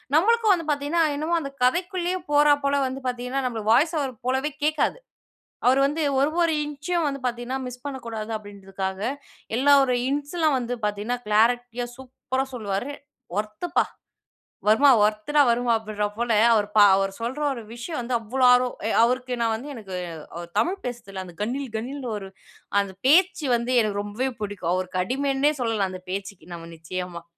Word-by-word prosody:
நம்மளுக்கும் 440 +5 +4
வந்து 335 -3 -2
பாத்தீங்கன்னா 295 +4 +1
என்னமோ, 315 +4 0
அந்த 275 -2 -6
கதைக்குள்ளேயே 360 +6 +1
போறா 295 0 +6
போல 280 0 +2
வந்து 260 +1 -5
பாத்தீங்கன்னா, 250 +2 -2
நம்மளுக்கு 220 -3 -1
வாய்ஸ் 315 +6 +3
ஓவர் 270 -2 -2
போலவே 265 +4 0
கேக்காது. 305 +9 +1 0.7
அவரு 260 +2 +5
வந்து 305 +3 -1 0.2
ஒரு, 285 - +3
ஒரு 335 -1 +2
இன்ச்சும் 300 +4 -2
வந்து 275 -1 -4
பாத்தீங்கன்னா, 245 +2 -3
மிஸ் 250 0 -8
பண்ணக்கூடாது 230 -5 -5
அப்டீன்றதுக்காக, 195 -2 -6 0.6
எல்லா 285 +3 +5
ஒரு 250 -1 +1
இன்ஸ்லாம் 290 +1 0
வந்து 245 0 -3
பாத்தீங்கன்னா, 210 +4 -2
கிளாரட்டியா, 240 +3 +2
சூப்பரா 260 0 -3
சொல்லுவாரு. 215 +3 -3 0.5
"ஒர்த்துப்பா! 215 +12 0 0.8
வர்மா, 225 +7 +6 0.2
ஒர்த்துடா 215 +8 +2
வர்மா" 240 0 +2
அப்படீன்ற 215 -1 -2
போல, 235 0 -1 0.2
அவரு 210 -2 +2
பா 210 - +9
அவரு 195 0 0
சொல்ற 245 +5 -3
ஒரு 235 -3 -7
விஷயம் 245 +5 -5
வந்து 245 +1 -2
அவ்ளோ 250 +4 0
ஆர்வம், 250 0 +2
எ - - +1
அவருக்கு 250 +1 0
நான் 225 -1 +2
வந்து 260 +7 -7
எனக்கு, 195 -5 -7 0.4
அவரு 170 0 -7
தமிழ் 375 - 0
பேசுறதுல 200 -6 -6
அந்த 175 -2 -12
கணீல் 255 +1 -3
கணீல்ன்னு 255 +2 -5
ஒரு, 195 -2 -8 0.5
அந்த 195 -1 -6
பேச்சு 345 0 +4
வந்து 235 +2 -1
எனக்கு 205 -2 -1
ரொம்பவே 215 +6 -2
புடிக்கும். 185 -4 -2
அவருக்கு 185 0 -2
அடிமைன்னே 275 +6 +1
சொல்லலாம், 220 -5 0
அந்த 185 0 -8
பேச்சுக்கி 195 -2 -6
நாம 165 0 -10
நிச்சயமா. 170 +1 -6
245 Hz, 160 wpm, -24 LUFS, 210-285 Hz, 0.8 s, பா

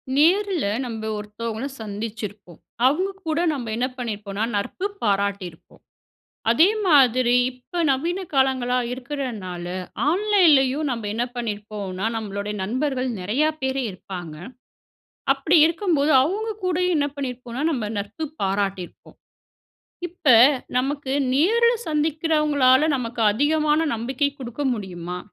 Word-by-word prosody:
நேரில 360 - +3 0.2
நம்ப 225 -3 -5
ஒருத்தவங்களை 220 +4 -5
சந்திச்சிருப்போம். 210 -3 -7 0.3
அவங்க 360 +9 +1 0.2
கூட 315 +1 0
நம்ப 265 -6 -4
என்ன 245 +2 0
பண்ணியிருப்போன்னா, 210 -4 -4
நட்பு 205 - -3 0.2
பாராட்டியிருப்போம். 200 -4 -2 0.7
அதே 315 +10 +6 0.2
மாதிரி 255 -6 +5 0.2
இப்போ, 255 +8 -9
நவீன 335 +8 0
காலங்களா 260 -2 +2
இருக்குறனால, 245 -10 -5 0.5
ஆன்லைன்லேயும் 315 -8 +3
நம்ப 230 -3 -3
என்ன 235 +2 0
பண்ணியிருப்போன்னா, 210 -4 -4
நம்மளுடைய 205 -1 -4
நண்பர்கள் 255 +4 -1
நிறைய 215 +11 0 0.2
பேர் 265 0 -1
இருப்பாங்க. 180 -3 -8 1.0
அப்படி 315 +5 +2
இருக்கும்போது, 325 -3 +1
அவங்க 410 +9 -2
கூடயும் 360 0 +1
என்ன 285 - +1
பண்ணியிருப்போம்னா, 255 -1 -5
நம்ப 245 -8 -2
நட்பு 210 +10 -4 0.2
பாராட்டியிருப்போம். 195 -2 -3 0.9
இப்ப 335 -3 -4 0.5
நமக்கு 275 +1 -2 0.2
நேருல 460 - +4 0.2
சந்திக்குறவங்களால 300 -3 +2
நமக்கு 240 -2 -5
அதிகமான 300 +5 +2
நம்பிக்கை 260 +5 -1
குடுக்க 245 +2 -5
முடியுமா? 180 -4 -6
255 Hz, 105 wpm, -23 LUFS, 210-300 Hz, 1.0 s, அதே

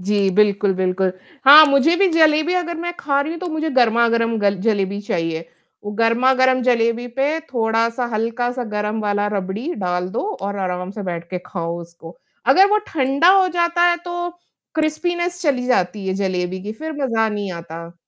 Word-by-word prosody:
जी 200 +1 +1
बिल्कुल, 205 -1 +2
बिल्कुल। 185 0 0 0.3
हाँ, 295 +3 +10
मुझे 280 +4 +3
भी 390 +1 +3
जलेबी 315 +1 +3
अगर 345 -1 -2
मैं 345 +1 -4
खा 280 0 0
रही 305 +3 -3
हूँ 335 - -7
तो 365 - -4
मुझे 315 -1 -2
गरमा-गरम 230 -2 +2
ग 205 - +2
जलेबी 200 -2 0
चाहिए, 165 -4 -3 0.4
वो 205 - -4
गरमा-गरम 255 +3 +3
जलेबी 235 -1 +1
पे 295 +4 +1
थोड़ा-सा 230 +1 0
हल्का-सा 245 +3 -2
गरम 210 +1 -2
वाला 205 -1 -1
रबड़ी 200 - -4
डाल 180 -1 -2
दो 225 - -3 0.2
और 200 +1 -3
आराम 180 -1 -3
से 205 +1 -7
बैठ 170 -2 -5
के 180 - -3
खाओ 170 -2 -4
उसको। 170 0 -13 0.3
अगर 365 +10 +6
वो 425 - +4
ठंडा 275 +2 +1
हो 370 - +1
जाता 345 0 0
है, 345 - +1
तो 350 0 -5 0.5
क्रिस्पीनेस 345 +3 -1
चली 265 -6 0
जाती 195 -4 0
है 190 - -1
जलेबी 185 -1 -2
की 210 +2 -5
फ़िर 315 +8 -7
मज़ा 225 -4 +1
नहीं 205 -3 -4
आता। 170 0 -9
230 Hz, 175 wpm, -20 LUFS, 195-300 Hz, 0.5 s, हाँ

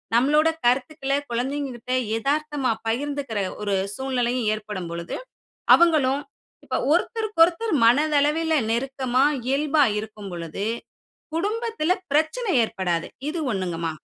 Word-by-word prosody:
நம்மளோட 300 +6 +4 0.2
கருத்துக்கள 270 +3 +1 0.2
கொழந்தைங்க 270 +4 -2
கிட்ட 240 +2 -8 0.3
எதார்த்தமா 290 0 0 0.2
பகிர்ந்துக்கிற 275 -1 -2 0.2
ஒரு 205 -1 0 0.2
சூழ்நிலையும் 250 -3 -1
ஏற்படும் 210 -5 -5
பொழுது, 170 0 -5 0.6
அவுங்களும் 290 -5 +4 0.4
இப்ப - - -3 0.2
ஒருத்தருக்கொருத்தர் 405 +1 +2
மனதளவில 300 +5 +3 0.2
நெருக்கமா, 260 +1 0 0.3
இயல்பா 290 +2 +3 0.2
இருக்கும் 210 -2 -8
பொழுது 170 +3 -5 0.7
குடும்பத்துல 420 -1 0 0.2
பிரச்சனை 320 +10 +1
ஏற்படாது, 180 -6 -1 0.2
இது 340 - -4
ஒண்ணுங்கம்மா. 170 -4 -2
270 Hz, 100 wpm, -24 LUFS, 225-310 Hz, 0.7 s, நம்மளோட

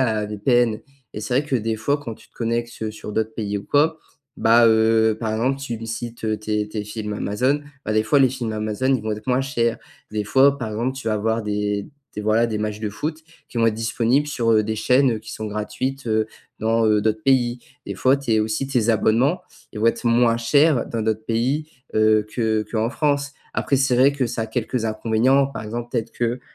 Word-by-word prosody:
un 110 -4 +1
VPN 110 +1 +1 0.3
et 105 - -4
c'est 110 +4 -3
vrai 145 - 0
que 135 - -1
des 115 -1 0
fois, 140 +7 0
quand 125 -6 -7
tu - - -19
te - - -43
connectes, 115 0 -3
heu, 110 - -2
sur 105 0 -8
d'autres 110 +1 -1
pays 105 -2 -2
ou 100 - -4
quoi, 155 +2 +2 0.4
bah, 115 +1 +5
heu, 110 0 +4
par 110 -2 -1
exemple, 130 +5 0
tu 120 -5 -4
me 115 - -7
cites, 115 0 -6
heu, 110 -1 0
tes 105 0 -2
tes 105 -1 -4
films 105 0 -5
Amazon, 125 +8 0 0.2
bah, 110 - -1
des 110 0 +3
fois, 110 +6 +3
les 130 -1 +5
films 120 -3 -4
Amazon, 110 +5 -1
ils 130 - +1
vont 110 0 -3
être 105 +4 -7
moins 125 +1 +3
chers. 120 -4 0 0.3
Des 105 -1 -2
fois, 135 +5 +4
par 110 -4 -4
exemple, 120 +5 -2
tu 130 - -8
vas 110 - +1
avoir 110 +1 -1
des 105 -1 -1 0.3
des 105 - -4
voilà, 110 +2 +3
des 110 -2 -3
matches 105 0 -3
de 110 - -2
foot 155 +10 -4 0.3
qui 120 - -6
vont 115 - +4
être 110 - +2
disponibles 115 +5 +1
sur, 120 -6 0
heu, 110 -1 +4
des 110 +1 -2
chaînes, 125 +4 +3
heu, 110 - -3
qui 110 0 -11
sont 110 - -5
gratuites, 120 +5 -4
heu, 110 -1 +1 0.3
dans, 115 0 +2
heu, 105 -1 +3
d'autres 110 0 0
pays. 125 -2 +2 0.3
Des - - -5
fois, 130 +1 +3
tes 115 -6 +1
aussi, 110 +5 -1
tes 125 -4 0
abonnements, 115 - +2 0.3
ils 105 - -6
vont - - 0
être 115 - +1
moins 115 0 +3
chers 140 +3 +3
dans 115 -1 -3
d'autres 110 0 -1
pays, 130 +7 0 0.3
heu, 110 -1 +3
que 110 -2 +1
qu'en 110 0 +1
France. 145 +1 0 0.2
Après, 140 - 0
c'est 135 -2 +2
vrai 135 +3 +5
que 135 -3 -1
ça 115 -1 -3
a - - -3
quelques 115 +1 -2
inconvénients. 115 +5 +2
Par 140 - -7
exemple, 120 +2 -5
peut-être 115 -2 -2
que, 120 +1 -2
115 Hz, 230 wpm, -22 LUFS, 110-130 Hz, 0.4 s, bah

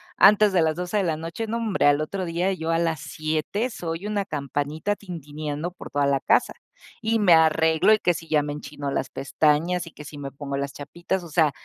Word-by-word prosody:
antes 210 0 +6
de 180 - +4
las 160 -1 +2
12 180 +3 -2
de 200 - +2
la 165 -4 0
noche, 165 +8 -5
n'hombre, 225 -2 0
al 145 0 +4
otro 185 +5 -3
día 175 +2 0
yo 165 -3 -3
a 165 - +2
las 165 -4 0
7 155 +9 -2
soy 170 -3 -5
una 210 -1 0
campanita 150 +4 -2
tintineando 155 -3 -5
por 180 - -11
toda 145 0 +1
la 140 -1 +1
casa, - - +2 0.5
y 225 0 +1
me 195 -5 +6
arreglo 160 +3 +4
y 215 - +3
que 175 - +2
si 165 0 -9
ya 150 -1 +3
me 145 0 -4
enchino 145 -1 -6
las - - -2
pestañas 160 +5 +1
y 165 - -11
que 150 - -12
si 145 - -9
me 140 -1 -6
pongo 140 0 -5
las 140 0 -3
chapitas, 170 +5 -4
o - - -10
sea, 155 -1 +3
165 Hz, 220 wpm, -24 LUFS, 150-185 Hz, 0.5 s, antes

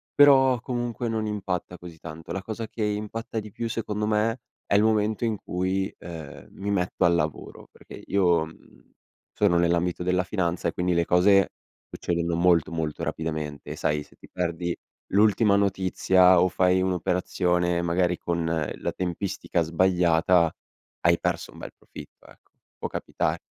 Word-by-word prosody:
però 135 -3 +6
comunque 120 -1 -3
non 110 -1 -1
impatta 95 -4 -3
così 85 -2 -12
tanto. 80 0 -9
La 95 - -3
cosa 110 +2 -5
che 110 0 -4
impatta 105 +2 -3
di 105 -1 -9
più 115 +3 -4
secondo 105 -2 -2
me 110 +3 +1 0.3
è - - -2
il 100 - +5
momento 110 +1 +1
in 110 -2 -1
cui, 95 +1 -2
ehm, 80 -4 -9
mi 100 +1 -4
metto 95 -2 0
al 85 - +4
lavoro, 80 -4 -3
perché - - -13
io, 90 -5 +2
mhmm, 80 - -18 0.4
sono 100 -4 +3
nell'ambito 85 +1 +1
della 90 0 +1
finanza 90 -3 -1
e - - -4
quindi 90 0 0
le 85 0 +2
cose 95 +3 +4 0.4
succedono 85 -1 -2
molto, 85 -2 +3
molto 80 -2 -3
rapidamente. 75 -2 -4
Sai 75 0 0
se - - -22
ti - - -16
perdi 85 -1 -2 0.4
l'ultima 105 +1 +4
notizia 95 -2 +4
o 90 - +4
fai 90 +1 +2
un'operazione 90 -1 0
magari 85 +1 +1
con 85 -1 -2 0.3
la - - -3
tempistica 90 -1 -2
sbagliata, 85 0 +3 0.5
hai 85 0 +3
perso - - -2
un - - -15
bel - - -8
profitto - - -13
ecco. - - -20 0.3
Può - - -4
capita - - -2
90 Hz, 155 wpm, -25 LUFS, 85-105 Hz, 0.5 s, però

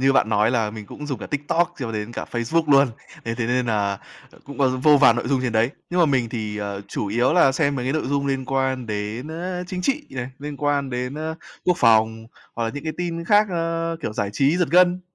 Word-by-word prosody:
như 135 +1 +4
bạn 110 - +3
nói 105 +1 +3
là 115 -4 0
mình 105 -1 -9
cũng 150 - -8
dùng 135 -3 -3
cả - - -7
TikTok 165 +4 0
cho 115 -4 -4
đến 105 +1 -4
cả - - -4
Facebook 145 +7 0
luôn, 140 0 +6 0.4
thế 115 - -2
thế 115 -1 -2
nên 125 +1 +1
là, 100 -3 0 0.3
ờ, - - -19
cũng 140 +1 -10
có 135 -2 +4
vô 150 0 +7
vàn 130 -4 +6
nội 120 - -2
dung 135 -1 +2
trên 125 -3 -1
đấy. 115 +2 +2 0.2
Nhưng 180 +1 +1
mà 170 - +6
mình 130 -5 +1
thì, 110 -3 -4
ờ, 100 -1 -4
chủ - - -3
yếu 120 +7 +2
là 160 -6 +5
xem 140 +1 +1
mấy 125 - -3
cái 130 - +1
nội 155 - -1
dung 140 0 0
liên 135 -1 -1
quan 130 -1 -1
đến, 105 +5 -4
a, 180 +3 -4
chính 180 0 -4
trị 275 +8 0
này, 125 -1 -4
liên 145 0 -6
quan 145 -1 0
đến, 125 +2 -3
a, 160 +1 -3 0.3
quốc 180 -1 +3
phòng, 110 -1 +3 0.3
hoặc 115 - -2
là 115 - -1
những 145 - -6
cái 155 - -2
tin 170 -1 -3
khác, 210 +4 +4
a, 165 -1 -1
kiểu, - - -3
giải 100 -1 -2
trí 140 +8 +2
giật 175 -2 +1
gân. 180 +1 +5
135 Hz, 260 wpm, -23 LUFS, 115-160 Hz, 0.4 s, vô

